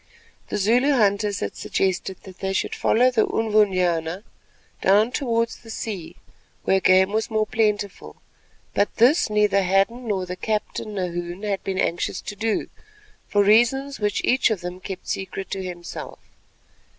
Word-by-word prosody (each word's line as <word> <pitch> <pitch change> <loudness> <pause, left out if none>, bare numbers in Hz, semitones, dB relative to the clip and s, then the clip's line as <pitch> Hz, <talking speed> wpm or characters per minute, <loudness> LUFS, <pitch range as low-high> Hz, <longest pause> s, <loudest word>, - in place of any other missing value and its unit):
The - - -2
Zulu 240 +8 +3
hunters 205 -4 +1
had - - -3
suggested 190 0 -1
that 190 -1 -13
they 190 0 -2
should - - -1
follow 250 +3 +3
the 230 -3 +2
Unvunyana 185 -5 +1 0.6
down 210 +5 +4
towards 230 -4 -1
the 230 - -16
sea 205 -6 -5 0.5
where 190 - +3
game 190 +1 +4
was 220 +1 -1
more 215 -1 +1
plentiful, 210 -2 -1 0.6
but 205 - +1
this 250 +6 +4
neither 210 -1 +3
Hadden, 195 +6 +1
nor 195 -3 -1
the 180 0 -5
captain, 215 +1 -3
Nahoon, 175 0 -4
had 200 -2 -2
been 190 -1 -3
anxious 170 -2 -1
to 205 - -7
do, 220 +1 -1 0.6
for 205 -1 +3
reasons 240 +7 +3
which 210 -2 -1
each 255 0 +3
of 210 -5 -2
them 180 +1 -6
kept 185 0 -8
secret 190 0 -4
to 190 - -3
himself. 175 -1 -7
205 Hz, 150 wpm, -23 LUFS, 190-220 Hz, 0.6 s, down